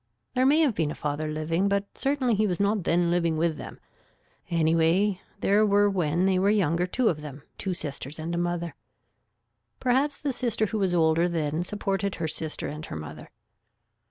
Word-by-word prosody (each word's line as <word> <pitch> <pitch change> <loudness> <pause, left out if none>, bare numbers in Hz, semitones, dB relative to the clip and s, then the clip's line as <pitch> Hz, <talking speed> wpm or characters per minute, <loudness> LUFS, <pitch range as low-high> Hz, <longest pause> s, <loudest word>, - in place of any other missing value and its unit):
There 255 +1 +3
may 300 +4 +5
have 290 -7 +3
been 160 -6 0
a - - -5
father 150 +1 -3
living 160 +5 0
but 200 0 +1
certainly 270 -3 +1
he 215 0 +2
was 180 -3 -2
not 200 -1 +1
then 170 0 +2
living 170 -2 +1
with 160 -1 0
them. - - -9 0.7
Anyway 165 +4 +2 0.2
there 205 +2 +4
were 205 0 +4
when 175 -1 +1
they 190 -1 +3
were 195 +2 +3
younger 180 -4 +2
two 245 +6 0
of 155 -6 0
them, 145 -1 -9 0.2
two 190 -2 -2
sisters, 145 -4 -5
and 160 +2 -4
a - - -1
mother. 175 -1 -2 1.1
Perhaps 270 +3 +1
the 285 -3 -2
sister 235 -3 0
who 215 +1 -3
was 185 -3 +1
older 165 +1 +3
then 160 -1 -1
supported 200 0 -2
her 165 - -2
sister 155 0 -3
and 150 +1 -6
her - - -6
mother. 75 0 -8
175 Hz, 185 wpm, -26 LUFS, 160-205 Hz, 1.1 s, may